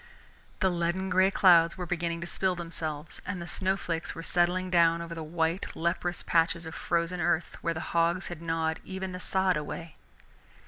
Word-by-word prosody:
The 190 -2 +3
leaden 175 +2 -1
gray 185 +1 +5
clouds 170 -3 +5
were 180 - -3
beginning 170 -1 -2
to - - -3
spill 185 +1 0
themselves, 165 -2 -5
and 185 -1 -4
the 170 - -5
snow 190 +2 0
flakes 165 -3 -3
were 165 - -6
settling 180 +2 +1
down 170 -1 +4
over 170 0 -6
the 165 - -6
white 165 +3 -1
leprous 170 +1 -1
patches 165 0 +2
of 160 - -7
frozen 170 +1 -1
earth 175 0 0
where 170 -1 -1
the 160 - -3
hogs 170 +2 +2
had 175 -2 -7
gnawed 165 -1 -1
even 190 0 -5
the 180 - -6
sod 190 -1 +1
away. 160 +1 -6
170 Hz, 185 wpm, -29 LUFS, 165-180 Hz, -, gray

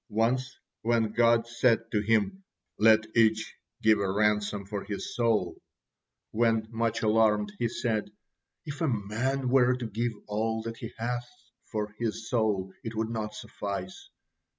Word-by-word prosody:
Once, 125 +4 0 0.2
when 115 -1 +1
God 115 0 +4
said 115 -1 +1
to 105 - +1
him, 115 - +1 0.4
"Let 110 0 +6
each 110 -1 +3 0.3
give 110 -1 +5
a 100 -2 0
ransom 105 0 +1
for 100 0 -4
his 100 0 -5
soul," 110 -7 +1 0.7
when, 115 -1 +2
much 115 -1 -1
alarmed, 105 -2 +3
he 120 - +2
said: 110 -3 -1 0.6
"If 145 +1 -6
a 165 - +2
man 125 +4 -1
were 125 -1 +4
to 125 -1 -5
give 115 +2 -2
all 110 +1 -1
that 115 0 -5
he 115 - -7
hath 120 +1 -3 0.4
for 105 -2 -3
his 115 -1 -3
soul, 105 -5 0
it 115 0 -5
would 110 0 -1
not 105 -2 -3
suffice." 100 -2 -6
110 Hz, 150 wpm, -28 LUFS, 105-120 Hz, 0.7 s, Let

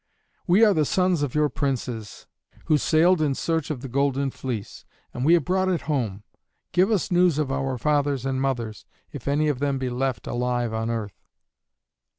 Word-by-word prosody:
"We 195 +6 +6
are 210 - +4
the 155 - +2
sons 180 +1 +1
of 145 -2 -2
your 150 0 +3
princes, 125 -7 -4 0.4
who 155 -2 +3
sailed 170 +3 +3
in 145 -3 +1
search 165 0 -1
of 145 -6 -4
the 135 - -6
Golden 140 +1 0
Fleece, 120 -7 -6 0.3
and 125 - -4
we 165 +5 +6
have 165 -6 0
brought 185 +1 +1
it 180 -3 0
home. 115 -10 -2 0.5
Give 185 +3 +3
us 210 -5 0
news 175 -3 +3
of 150 -3 -1
our 135 -1 -1
fathers 145 -1 0
and 135 -1 -1
mothers, 120 -5 -3 0.2
if 140 -4 -9
any 145 +2 +2
of 145 -4 0
them 140 -1 0
be 130 -1 -3
left 125 -3 -2
alive 120 -1 -1
on 110 +1 -2
earth." 110 -4 -4
140 Hz, 185 wpm, -24 LUFS, 125-155 Hz, 0.5 s, We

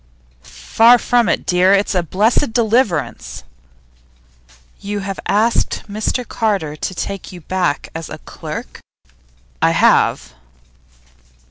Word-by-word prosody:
'Far 230 - +3
from 240 -3 +1
it, - - -1
dear. 180 +2 +3
It's 200 +2 0
a 180 - +2
blessed 220 - +1
deliverance.' 220 - 0 1.4
'You 205 0 -4
have 195 0 -5
asked 220 +3 +1
Mr 215 +4 -2
Carter 195 -10 -1
to 185 +4 -5
take 195 +2 -5
you 180 -2 -11
back 180 -3 -2
as 165 -1 -6
a - - -7
clerk?' - - -8 0.8
'I - - +4
have. - - +2
200 Hz, 115 wpm, -18 LUFS, 180-225 Hz, 1.4 s, I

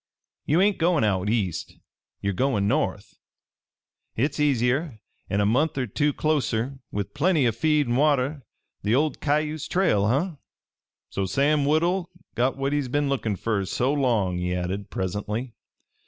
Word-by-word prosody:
Ye 155 +4 +3
ain't 200 +1 +3
goin' 165 -5 +3
out 100 -2 +1
east 105 -7 -1 0.5
ye're 100 0 -1
goin' 105 -2 +1
north. 120 -5 -1 1.0
Hit's 145 +6 -1
easier, 135 -1 +1 0.3
an' 100 - +1
a - - +2
month 135 +8 +1
er 130 - 0
two 145 +7 0
closter, 135 -4 -1
with 100 -1 -4
plenty 155 -3 +2
o' - - +3
feed 150 +6 +2
an' 120 - 0
water 145 0 +2 0.4
the 105 +4 +1
old 150 +3 +1
Cayuse 150 +1 0
trail, 105 - +2
huh? 150 - 0 0.7
"So 100 -1 -1
Sam 140 +8 +2
Woodhull 170 +4 +1 0.2
got 125 +3 0
what 135 +1 -1
he's 145 -3 0
been 145 +2 0
lookin' 115 -6 -1
fer 105 0 -1
so 125 +8 0
long!" 110 -11 +1
he 90 0 -1
added 95 +3 -3
presently. 105 +6 -3
130 Hz, 155 wpm, -25 LUFS, 105-150 Hz, 1.0 s, Ye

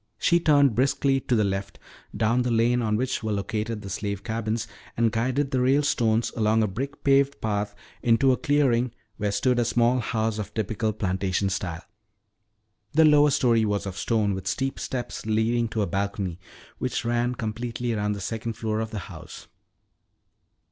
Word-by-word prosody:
She 170 +8 +3
turned 145 -6 +4
briskly 135 +3 +2
to 125 - 0
the 110 - +3
left 100 0 -3 0.4
down 115 +3 +2
the 125 - -1
lane 120 +1 +2
on 110 -2 +1
which 130 +1 -1
were 110 -1 -2
located 105 +2 -3
the 100 - -7
slave 100 0 -3
cabins 115 0 -2 0.3
and 115 -1 +3
guided 130 +5 0
the 130 - +1
Ralestones 125 -4 +2
along 110 0 +2
a - - +1
brick 135 +9 -5
paved 140 0 +3
path 105 -1 -2 0.3
into 120 +3 +4
a 125 - +2
clearing 130 -5 +2 0.2
where 105 -1 -1
stood 120 +5 +1
a - - +3
small 120 +2 +2
house 110 -2 -1
of 105 -1 -6
typical 110 +1 -1
plantation 95 -1 -1
style. 90 -3 -4 1.1
The 160 +1 +6
lower 150 -1 +6
story 120 -5 +3
was 105 -2 -1
of 95 -2 -5
stone 105 0 0
with 95 0 -5
steep 135 +7 -2
steps 120 -3 -5
leading 115 +2 +1
to 110 -1 -1
a - - +1
balcony 100 -3 -2 0.4
which - - -2
ran 120 +1 0
completely 120 +2 -3
around 105 -1 0
the 100 - -6
second 115 0 -3
floor 110 0 -2
of 110 0 -2
the 110 -2 -5
house. - - -11
115 Hz, 175 wpm, -25 LUFS, 105-125 Hz, 1.1 s, The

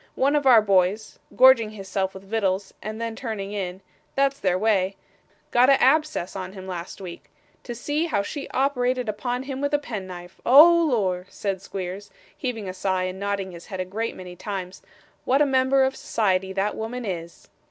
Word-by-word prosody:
One 280 +3 +2
of 290 -2 +1
our 235 -4 +7
boys 195 +1 +1 0.2
gorging 255 -4 +6
his 200 -3 -10
self 190 0 -2
with 190 - -10
vittles, 195 -2 -1
and 215 +1 -6
then 230 -1 -3
turning 220 -5 -5
in; 190 -2 -4 0.3
that's 275 0 +1
their 180 -2 +1
way 195 -2 +1 0.6
got 245 +2 +5
a 275 -1 +5
abscess 300 - +2
on 185 -1 -5
him 190 -2 -9
last 180 -2 -6
week. 180 -3 -9 0.4
To 240 - -5
see 295 +7 -1
how 200 -11 0
she 280 +7 -6
operated 255 -2 0
upon 245 +4 -2
him 270 0 -5
with 285 +1 +1
a - - +4
pen 220 -9 -6
knife! 175 0 -10
Oh 330 +6 +7
Lor!' 190 -7 0
said 195 -2 -3
Squeers, 195 +1 -6 0.3
heaving 225 -6 -4
a 185 - -4
sigh, 185 0 -1
and 185 +1 -4
nodding 200 -1 -2
his 170 -1 -11
head 190 -3 -6
a 185 - -1
great 220 +5 -3
many 180 -1 -9
times, 185 -1 -6 0.4
'what 265 +2 +2
a 295 - +5
member 265 0 +3
of 265 0 0
society 190 -3 0
that 195 +2 -1
woman 235 +2 -5
is! 170 -4 -6
210 Hz, 195 wpm, -24 LUFS, 190-255 Hz, 0.6 s, our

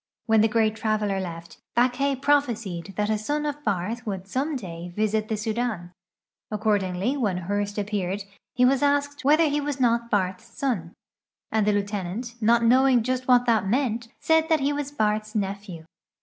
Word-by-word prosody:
When 220 -2 +4
the 220 - +5
great 220 -1 +1
traveler 210 -3 0
left, 170 -2 -7 0.2
Backhay 255 +3 +2
prophesied 225 -11 0
that 210 +1 +1
a 215 - 0
son 295 +7 -2
of 295 0 -4
Barth 210 +3 -2
would 190 -2 -4
some 275 +9 -1
day 175 -7 -6
visit 215 0 0
the 220 - -2
Sudan. 215 -4 -2 0.6
Accordingly 205 +1 0
when 205 -9 0
Ilourst 205 +2 -2
aj) 205 - -1
peared 200 -1 -2 0.3
he 250 0 +4
was 270 +2 +3
asked 285 0 +1
whether 305 +4 +5
he 295 0 0
was 285 -1 -3
not 235 -1 +2
Barth's 190 0 0
son, 225 -8 -3 0.6
and 215 -2 +1
the - - +5
lieutenant, 205 +3 -3
not 230 +2 +4
knowing 255 0 +5
just 255 +1 -2
what 245 -1 +5
that 220 -5 +2
meant, 235 0 0
said 320 0 +2
that 320 -1 +4
he 280 +2 +1
was 285 -1 -3
I'arth's 215 0 0
nephew. 195 -4 -4
220 Hz, 175 wpm, -25 LUFS, 200-255 Hz, 0.6 s, the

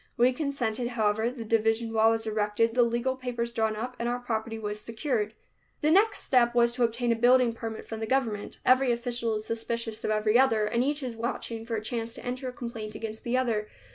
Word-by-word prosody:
We 245 +2 +4
consented, 250 -5 -2
however, 220 -1 +1
the 240 -2 -7
division 225 +1 +1
wall 220 0 +5
was 225 0 0
erected, 215 +1 +1
the 245 - +4
legal 240 +2 +1
papers 240 -2 -3
drawn 220 -2 0
up 250 +4 -4
and 235 0 -1
our 245 - 0
property 225 -2 -3
was 210 -1 -4
secured. 225 -1 -2 0.5
The 305 0 +3
next 410 +6 +4
step 240 -2 +3
was 235 0 +4
to 245 - 0
obtain 235 +1 +1
a - - +3
building 245 +1 +4
permit 225 -1 -6
from 225 - -5
the 220 - -3
government. 225 -5 -1
Every 255 0 +5
official 235 -1 -1
is 215 0 -4
suspicious 230 -1 -4
of - - -1
every 215 +2 +3
other, 225 -5 +4
and 235 +3 +1
each 290 +1 -1
is 245 -3 -4
watching 230 -1 -4
for 230 - -2
a 215 - -3
chance 230 0 -4
to - - -10
enter 255 +1 -3
a - - -6
complaint 230 -3 -6
against 220 -1 -6
the 240 +1 0
other. 225 -5 0
235 Hz, 220 wpm, -28 LUFS, 220-245 Hz, 0.5 s, wall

